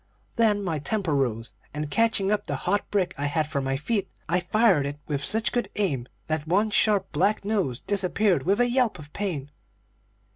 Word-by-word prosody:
Then 215 Hz, -3 st, +2 dB
my 165 Hz, -5 st, -1 dB
temper 185 Hz, +1 st, -1 dB
rose, 120 Hz, -4 st, -1 dB, 0.2 s
and 150 Hz, -1 st, -4 dB
catching 220 Hz, -1 st, +2 dB
up 210 Hz, -, 0 dB
the -, -, -1 dB
hot 200 Hz, +3 st, 0 dB
brick 195 Hz, -3 st, 0 dB
I 145 Hz, -, 0 dB
had 155 Hz, +1 st, 0 dB
for 145 Hz, -2 st, -2 dB
my 135 Hz, 0 st, -1 dB
feet, 195 Hz, -, -1 dB, 0.2 s
I 175 Hz, +2 st, +2 dB
fired 185 Hz, -5 st, +3 dB
it 145 Hz, +1 st, -5 dB
with 145 Hz, -2 st, -2 dB
such 220 Hz, +7 st, +2 dB
good 240 Hz, -5 st, -1 dB
aim 145 Hz, -12 st, -1 dB, 0.2 s
that 155 Hz, -1 st, -2 dB
one 205 Hz, +6 st, +2 dB
sharp, 205 Hz, -2 st, +2 dB
black 195 Hz, +6 st, +1 dB
nose 190 Hz, -, 0 dB
disappeared 200 Hz, -1 st, +1 dB
with 200 Hz, +5 st, +1 dB
a 245 Hz, -, +4 dB
yelp 245 Hz, -5 st, +1 dB
of 150 Hz, -2 st, -12 dB
pain. 155 Hz, -9 st, -3 dB
185 Hz, 190 wpm, -26 LUFS, 150-210 Hz, 0.2 s, a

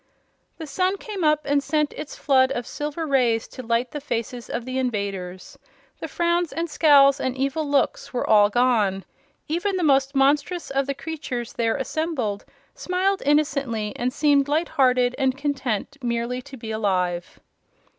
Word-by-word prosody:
The 320 Hz, -, -6 dB
sun 370 Hz, +6 st, 0 dB
came 400 Hz, -3 st, -5 dB
up 305 Hz, -1 st, +3 dB
and 285 Hz, 0 st, +2 dB
sent 300 Hz, +1 st, 0 dB
its 300 Hz, -, -7 dB
flood 260 Hz, -2 st, +3 dB
of 240 Hz, -, -4 dB
silver 300 Hz, +5 st, -4 dB
rays 245 Hz, -6 st, +2 dB
to -, -, -8 dB
light 235 Hz, +1 st, -1 dB
the 295 Hz, -, -5 dB
faces 240 Hz, -2 st, -4 dB
of 235 Hz, 0 st, -4 dB
the 255 Hz, +1 st, -2 dB
invaders. 200 Hz, -7 st, -4 dB, 0.4 s
The -, -, -5 dB
frowns 345 Hz, 0 st, 0 dB
and 335 Hz, +1 st, -2 dB
scowls 285 Hz, -3 st, +5 dB
and 260 Hz, 0 st, -2 dB
evil 275 Hz, +3 st, -1 dB
looks 285 Hz, -1 st, 0 dB
were 250 Hz, -, -2 dB
all 205 Hz, -1 st, +6 dB
gone. 215 Hz, -5 st, +1 dB, 0.4 s
Even 375 Hz, +5 st, -1 dB
the 360 Hz, -, -1 dB
most 275 Hz, -2 st, +3 dB
monstrous 285 Hz, +5 st, +1 dB
of 275 Hz, 0 st, 0 dB
the 280 Hz, -, -2 dB
creatures 280 Hz, -6 st, -5 dB
there 230 Hz, -1 st, 0 dB
assembled 265 Hz, -8 st, -2 dB, 0.3 s
smiled 380 Hz, +2 st, -1 dB
innocently 275 Hz, -8 st, +1 dB
and 245 Hz, +1 st, -1 dB
seemed 285 Hz, -1 st, +3 dB
light 315 Hz, +4 st, 0 dB
hearted 255 Hz, -4 st, +3 dB
and 265 Hz, -1 st, +1 dB
content 280 Hz, -3 st, -2 dB
merely 240 Hz, +1 st, -2 dB
to 270 Hz, +1 st, -11 dB
be 225 Hz, -2 st, -7 dB
alive. 180 Hz, -5 st, -1 dB
270 Hz, 165 wpm, -23 LUFS, 235-300 Hz, 0.4 s, all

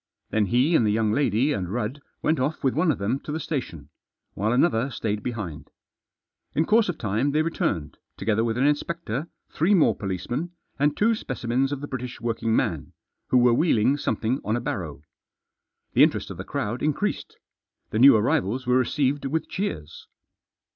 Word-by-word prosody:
Then 110 Hz, -2 st, +2 dB
he 130 Hz, -, +3 dB
and 120 Hz, -, +4 dB
the 105 Hz, -, +2 dB
young 110 Hz, 0 st, +1 dB
lady 130 Hz, +3 st, +2 dB
and 90 Hz, -6 st, -3 dB
Rudd 120 Hz, +5 st, -3 dB, 0.2 s
went 155 Hz, -2 st, +2 dB
off 145 Hz, +5 st, -2 dB
with 135 Hz, -, +2 dB
one 160 Hz, +3 st, +2 dB
of 130 Hz, -, -2 dB
them 110 Hz, +7 st, -1 dB
to 150 Hz, -, -7 dB
the 155 Hz, -, -2 dB
station, 85 Hz, -, -5 dB, 0.4 s
while 105 Hz, +3 st, -1 dB
another 125 Hz, -1 st, +2 dB
stayed 105 Hz, -4 st, -3 dB
behind. 105 Hz, -11 st, -5 dB, 0.9 s
In 160 Hz, -, +2 dB
course 220 Hz, +1 st, +3 dB
of 170 Hz, -, -2 dB
time 115 Hz, +7 st, 0 dB
they 155 Hz, +1 st, +3 dB
returned, 80 Hz, -, -2 dB, 0.2 s
together 110 Hz, +2 st, +1 dB
with 115 Hz, 0 st, -1 dB
an 130 Hz, -, +2 dB
inspector, 150 Hz, -1 st, -1 dB, 0.2 s
three 180 Hz, +6 st, +3 dB
more 170 Hz, -, +4 dB
policemen, 105 Hz, -, -4 dB, 0.3 s
and 145 Hz, +1 st, +2 dB
two 230 Hz, +3 st, +3 dB
specimens 130 Hz, -, -1 dB
of 140 Hz, -1 st, -3 dB
the 145 Hz, -, -5 dB
British 125 Hz, -2 st, -6 dB
working 115 Hz, -1 st, -1 dB
man, -, -, -1 dB, 0.3 s
who 130 Hz, -, +3 dB
were 120 Hz, -1 st, +5 dB
wheeling 130 Hz, -3 st, +3 dB
something 130 Hz, -2 st, -1 dB
on 110 Hz, -, 0 dB
a -, -, 0 dB
barrow. 90 Hz, -, -5 dB, 0.9 s
The -, -, +4 dB
interest -, -, +3 dB
of -, -, -8 dB
the -, -, -5 dB
crowd 125 Hz, -4 st, -3 dB
increased. 155 Hz, +8 st, -2 dB, 0.5 s
The 110 Hz, -, -1 dB
new 135 Hz, 0 st, +9 dB
arrivals 110 Hz, +3 st, +1 dB
were 125 Hz, +1 st, +3 dB
received 140 Hz, +2 st, 0 dB
with 160 Hz, +3 st, -2 dB
cheers. 85 Hz, -, -5 dB
125 Hz, 180 wpm, -25 LUFS, 110-150 Hz, 0.9 s, new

